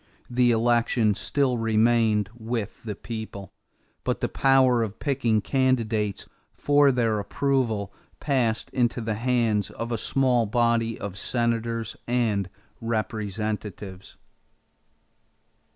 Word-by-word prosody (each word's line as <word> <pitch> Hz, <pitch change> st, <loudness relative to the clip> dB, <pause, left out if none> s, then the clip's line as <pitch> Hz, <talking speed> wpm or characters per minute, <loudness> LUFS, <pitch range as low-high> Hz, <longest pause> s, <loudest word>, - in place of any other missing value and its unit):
The 125 Hz, 0 st, +3 dB
election 115 Hz, -1 st, +2 dB
still 130 Hz, +3 st, 0 dB
remained 110 Hz, -2 st, +2 dB
with 115 Hz, -2 st, -4 dB
the 105 Hz, -3 st, -5 dB
people; 110 Hz, -4 st, -7 dB, 0.5 s
but -, -, -1 dB
the -, -, 0 dB
power 130 Hz, -3 st, +4 dB
of 110 Hz, -2 st, -3 dB
picking 120 Hz, -7 st, +1 dB
candidates 115 Hz, -6 st, 0 dB, 0.3 s
for 145 Hz, -1 st, +4 dB
their 115 Hz, -4 st, +1 dB
approval 110 Hz, -3 st, -1 dB, 0.3 s
passed 125 Hz, -6 st, 0 dB
into 120 Hz, -1 st, +1 dB
the 110 Hz, -1 st, -2 dB
hands 115 Hz, -3 st, +1 dB
of 115 Hz, +1 st, -6 dB
a 115 Hz, -, -1 dB
small 125 Hz, -2 st, +2 dB
body 115 Hz, 0 st, +1 dB
of 100 Hz, -1 st, -6 dB
Senators 115 Hz, -1 st, -1 dB
and 110 Hz, -6 st, 0 dB, 0.3 s
Representatives. 105 Hz, -3 st, -4 dB
115 Hz, 105 wpm, -25 LUFS, 110-120 Hz, 0.5 s, power